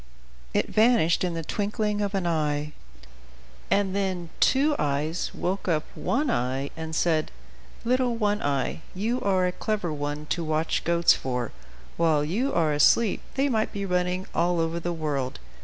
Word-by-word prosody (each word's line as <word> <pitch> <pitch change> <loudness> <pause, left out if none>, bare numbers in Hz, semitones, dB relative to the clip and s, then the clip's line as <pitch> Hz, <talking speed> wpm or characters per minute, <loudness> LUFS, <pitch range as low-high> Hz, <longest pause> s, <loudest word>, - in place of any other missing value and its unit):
It - - +2
vanished 215 -8 +3
in 175 -2 -1
the 165 - -3
twinkling 210 +3 -1
of 200 0 -1
an 190 -2 -1
eye; 150 -3 0 1.0
and 195 -1 +2
then 185 -4 -2
Two 290 +3 +4
Eyes 150 +4 -1
woke 190 +2 -3
up 155 -3 +2
One 275 0 0
Eye, 130 +3 -1
and 160 0 -5
said: 160 -2 +1 0.6
"Little 250 0 +2
One 210 -2 0
Eye, 140 +2 -1
you 230 +6 -1
are 190 -2 +2
a 180 - +1
clever 190 -4 -2
one 145 0 -4
to 170 - 0
watch 155 0 0
goats; 170 0 +5
for, 125 -3 -3 0.5
while 155 -3 +3
you 230 - 0
are 160 - +2
asleep, 190 +9 +4
they 270 +1 +2
might 220 -5 0
be 200 -1 -3
running 180 0 0
all 175 0 +1
over 165 +1 0
the 175 +1 -2
world. 145 -6 -2
175 Hz, 160 wpm, -26 LUFS, 155-205 Hz, 1.0 s, goats